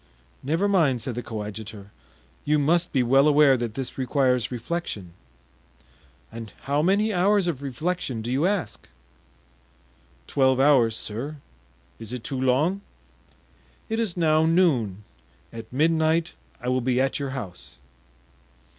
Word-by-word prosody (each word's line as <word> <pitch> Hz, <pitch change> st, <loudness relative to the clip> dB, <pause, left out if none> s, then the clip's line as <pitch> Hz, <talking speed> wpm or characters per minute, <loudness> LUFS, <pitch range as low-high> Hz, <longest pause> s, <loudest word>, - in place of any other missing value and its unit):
"Never 165 Hz, +9 st, 0 dB
mind," 160 Hz, -11 st, +2 dB
said 120 Hz, +2 st, -4 dB
the 120 Hz, -, -4 dB
coadjutor; 105 Hz, -2 st, -7 dB, 0.5 s
"you 150 Hz, +1 st, +2 dB
must 165 Hz, +4 st, +2 dB
be 130 Hz, -3 st, +2 dB
well 135 Hz, +4 st, +4 dB
aware 145 Hz, -2 st, +5 dB
that 120 Hz, -3 st, -4 dB
this 135 Hz, 0 st, -5 dB
requires 130 Hz, -2 st, +1 dB
reflection." 115 Hz, -, -5 dB, 1.2 s
"And 115 Hz, -1 st, -8 dB
how 145 Hz, +2 st, +1 dB
many 205 Hz, +6 st, +2 dB
hours 195 Hz, +2 st, +3 dB
of 160 Hz, -6 st, -2 dB
reflection 140 Hz, -3 st, -3 dB
do 120 Hz, -, -3 dB
you 140 Hz, +7 st, +2 dB
ask?" 190 Hz, -, -3 dB, 1.4 s
"Twelve 130 Hz, -, +2 dB
hours, 130 Hz, -6 st, +4 dB
sir; 125 Hz, +8 st, -5 dB, 0.6 s
is 115 Hz, +1 st, -7 dB
it 125 Hz, -3 st, -5 dB
too 130 Hz, -2 st, -4 dB
long?" 150 Hz, +10 st, +1 dB, 1.1 s
"It 225 Hz, +1 st, -1 dB
is 210 Hz, -6 st, -2 dB
now 155 Hz, -2 st, +3 dB
noon; 130 Hz, -, +2 dB, 0.5 s
at 115 Hz, -1 st, -9 dB
midnight 160 Hz, +4 st, +1 dB, 0.3 s
I 125 Hz, -, -7 dB
will 130 Hz, 0 st, +1 dB
be 125 Hz, 0 st, +1 dB
at 135 Hz, +2 st, 0 dB
your 140 Hz, -1 st, -3 dB
house." 65 Hz, -, -9 dB
135 Hz, 135 wpm, -25 LUFS, 120-165 Hz, 1.4 s, aware